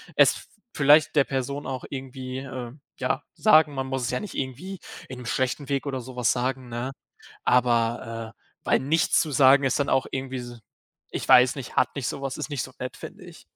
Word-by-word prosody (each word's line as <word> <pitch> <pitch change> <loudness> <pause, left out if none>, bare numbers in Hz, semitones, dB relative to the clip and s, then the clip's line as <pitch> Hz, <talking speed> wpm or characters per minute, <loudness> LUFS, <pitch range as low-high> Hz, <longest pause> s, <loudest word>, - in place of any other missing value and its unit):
es - - +4 0.3
vielleicht 150 +2 +5
der 145 -2 +5
Person 135 +2 -3
auch 130 -2 -4
irgendwie, 130 -1 -6
ähm, 130 0 -7 0.2
ja - - 0
sagen, 155 -2 +5
man 135 0 -2
muss 130 0 -3
es 120 - -1
ja 125 - -1
nicht 210 - -7
irgendwie 145 +9 -5 0.3
in 130 - -7
'nem 125 - -9
schlechten 130 +4 -1
Weg 140 0 -1
oder 135 -2 -3
sowas 125 -1 0
sagen, 130 0 -2
ne? 120 +3 -4 0.5
Aber, 115 -2 +1
äh, - - -44 0.2
weil - - +3
nichts 160 +5 +2
zu 160 - -3
sagen 135 +1 +6
ist 135 - +1
dann 140 - 0
auch 135 - +2
irgendwie 130 0 -4
s 120 -1 -8 0.5
ich - - -4
weiß 125 +1 +7
nicht, 135 -3 -8
hat - - +2
nicht 130 -5 -2
sowas, 135 +1 -4
ist - - -5
nicht 140 -4 -2
so 130 - -8
nett, 125 - -5
finde - - -10
ich. - - -14
130 Hz, 205 wpm, -25 LUFS, 125-140 Hz, 0.5 s, weiß